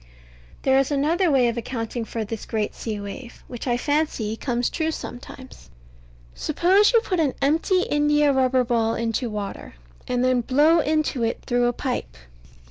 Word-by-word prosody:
But - - -25
there 265 0 +4
is 270 - +1
another 315 +5 +1
way 265 -4 +4
of 235 0 -1
accounting 230 0 -4
for 225 -1 -4
this 220 +1 -6
great 215 -2 -2
sea 215 -3 -5
wave, 205 +5 -9
which 245 +1 -7
I 240 -1 +1
fancy 290 -6 -1
comes 240 0 -1
true 320 -1 -1
sometimes. 260 - -9 0.6
Suppose 370 +7 +3
you 465 -2 +4
put 370 -6 -2
an 295 -5 +1
empty 325 +6 +2
india 295 -1 +2
rubber 260 -1 +2
ball 230 -2 0
into 230 +2 -2
water, 205 - -6 0.3
and 250 0 0
then 255 -1 +2
blow 295 +7 +4
into 310 -4 0
it 230 0 -2
through 245 -1 +1
a 240 - 0
pipe. 250 - -4
250 Hz, 170 wpm, -23 LUFS, 225-295 Hz, 0.6 s, there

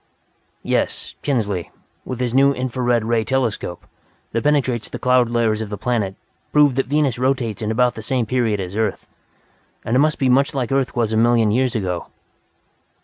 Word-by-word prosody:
"Yes, - - -1
Kinsley, 105 - -1 0.4
with 125 -2 -5
his 125 -2 -1
new 140 +1 +4
infra 125 0 -3
red 120 -2 +2
ray 115 -1 +1
telescope, 120 -9 -2 0.5
that 115 - -1
penetrates 135 -6 +1
the - - -5
cloud 125 -2 +3
layers 115 -2 +1
of 110 - -5
the 105 - -5
planet, 110 -3 -1 0.4
proved 145 -3 +4
that 135 - +1
Venus 140 -4 +1
rotates 125 -5 0
in 105 - -2
about 125 +2 +2
the 110 - -8
same 120 +2 0
period 115 -3 0
as 95 0 -5
Earth; 110 -2 -2 0.8
and 115 - 0
it - - +4
must 150 +1 +2
be 135 - +1
much 135 +4 +3
like 125 -3 -2
Earth 135 -1 0
was 115 -2 0
a - - +1
million 115 -1 +3
years 125 +2 +1
ago." 90 -5 -2
120 Hz, 185 wpm, -20 LUFS, 110-130 Hz, 0.8 s, new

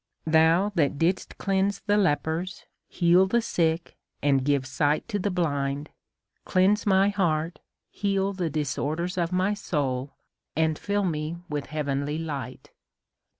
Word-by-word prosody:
Thou 160 +5 +4
that 150 -5 +1
didst 175 +5 0
cleanse 195 0 0
the 205 - +1
lepers, 175 -1 0 0.2
heal 180 +2 +4
the 235 +5 +2
sick, 170 -7 -1 0.3
and 135 -2 +3
give 140 -1 +1
sight 145 +3 0
to 205 -3 -1
the 205 - 0
blind, 145 -5 -1 0.5
cleanse 195 +4 +2
my 195 0 +4
heart, 170 -5 0 0.3
heal 195 -1 0
the 180 -4 -2
dis 150 -2 -2
orders 170 +5 -2
of 175 -1 -1
my 185 +3 +1
soul, 140 -9 -2 0.4
and 160 0 +1
fill 205 0 0
me 155 -1 -2
with 145 -2 -3
heavenly 145 0 -2
light." 140 -6 -6
165 Hz, 140 wpm, -26 LUFS, 150-190 Hz, 0.5 s, Thou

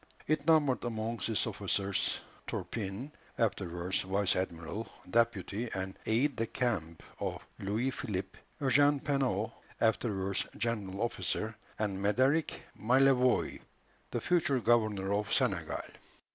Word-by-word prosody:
It 155 0 0
numbered 150 -5 +4
among 115 -1 -2
its 110 -2 +1
officers, 100 -1 -1 0.3
Turpin, 110 +6 -4 0.3
afterwards 90 -5 0
vice 95 +1 +1
admiral, 90 +4 -3 0.2
deputy, 110 +1 +1
and 95 0 -3
aide 125 +5 +2
de 115 - 0
camp 100 -12 -1 0.2
of - - -2 0.2
Louis 110 +7 0
Philippe; 95 -7 -4 0.2
Eugène 145 +1 +4
Penaud, 125 -7 +1 0.3
afterwards 100 -4 +1
general 105 -4 -2
officer, 110 -2 -1 0.2
and 100 -3 -1
Médéric 130 +10 +3 0.3
Malavois, 125 +1 +4 0.5
the - - -1
future 160 -7 +2
governor 110 -5 +2
of 105 0 -1
Senegal. - - +1
110 Hz, 110 wpm, -32 LUFS, 95-130 Hz, 0.5 s, numbered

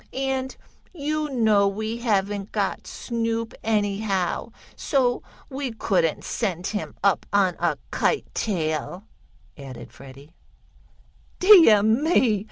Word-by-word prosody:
And 265 0 -2 0.4
you 305 -1 -2
know 220 -6 +3
we 220 +3 -3
haven't 205 -3 -1
got 200 -3 -2
Snoop, 230 -1 -3
anyhow, 205 -2 -1 0.2
so 250 -3 0 0.3
we 265 -2 -5
couldn't 185 -8 0
send 185 -6 -3
him 210 +1 -4
up 200 -1 +2
on 195 -3 +2
a 170 -4 0
kite - - 0
tail," 170 -2 -2 0.6
added 135 -3 -10
Freddie. 140 +3 -14 1.0
"Deah 335 - +7
me! 230 - +2
215 Hz, 105 wpm, -24 LUFS, 190-245 Hz, 1.0 s, Deah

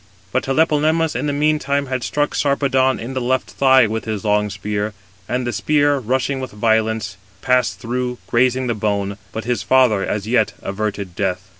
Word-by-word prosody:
But 130 - 0
Tlepolemus 155 +2 +2
in - - -1
the - - +1
meantime 145 -1 +1
had 130 -1 -3
struck 145 +6 -1
Sarpedon 135 -2 +1
in 120 +4 -6
the 130 - -2
left 130 +1 -1
thigh 130 -2 +5
with 110 +1 -3
his 110 -1 -4
long 105 0 +2
spear; 105 +1 -3 0.4
and 125 +1 -1
the 120 - -2
spear, 145 -2 +2
rushing 130 +3 -1
with 130 - -5
violence, 110 -2 0 0.3
passed 125 -7 +2
through, 125 +2 -3
grazing 130 +2 +2
the 120 - 0
bone: 100 -2 -2
but 110 - -5
his 120 0 -1
father 125 -7 +3
as 105 -1 -2
yet 110 -2 +2
averted 100 -2 -4
death. 95 0 -2
125 Hz, 175 wpm, -19 LUFS, 105-135 Hz, 0.4 s, thigh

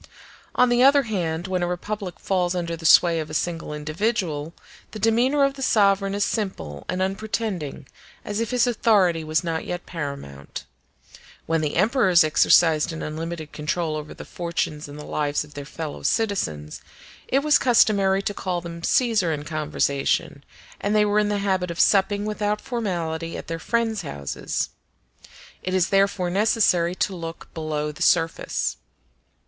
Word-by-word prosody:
On 250 - +4
the 240 0 +3
other 280 +2 +6
hand, 175 -7 -2
when 185 -1 -1
a 175 - 0
republic 185 +1 -4
falls 180 -2 0
under 170 -1 -2
the 165 -1 -1
sway 170 0 +6
of 155 -1 -4
a 155 - -6
single 165 -1 -2
individual, 155 0 -2 0.4
the - - -5
demeanor 240 +7 +3
of 275 0 +2
the 270 - -10
sovereign 200 -4 +3
is 205 - +1
simple 135 - -4
and 185 +1 0
unpretending, 195 - -3 0.4
as 205 +1 -3
if 230 - -1
his 250 -1 +2
authority 200 -8 +2
was 155 +1 0
not 165 -1 -2
yet 175 0 -5
paramount. 140 - -6 0.8
When 165 -1 0
the 150 -2 -2
emperors 190 -3 +4
exercised 155 0 +4
an 160 - -6
unlimited 160 0 -5
control 155 +1 -2
over 150 0 -6
the - - -9
fortunes 165 -3 -3
and 145 +1 -10
the 150 - -8
lives 145 -1 -1
of 150 0 -15
their 145 -1 -7
fellow 155 +1 -6
citizens, 80 - -1 0.5
it 275 +2 +1
was 300 -1 +5
customary 200 -5 +3
to 205 - -2
call 185 -3 -2
them 170 -1 -8
Caesar 220 -9 +2
in 150 -2 -3
conversation, 145 -2 -1 0.4
and 205 +2 0
they 210 0 +5
were 205 0 +2
in 210 0 +1
the 205 - 0
habit 190 -3 0
of 170 - -6
supping 200 +1 +3
without 210 0 -1
formality 170 -9 -3
at - - -7
their 165 0 -4
friends' 225 +2 0
houses. 70 - -4 0.9
It 185 0 -2
is 185 -1 +2
therefore 195 -2 +2
necessary 190 -4 +2
to 190 0 -1
look 165 -1 -8
below 155 -2 -3
the 150 - -13
surface. 165 -2 +1
180 Hz, 165 wpm, -24 LUFS, 160-210 Hz, 0.9 s, other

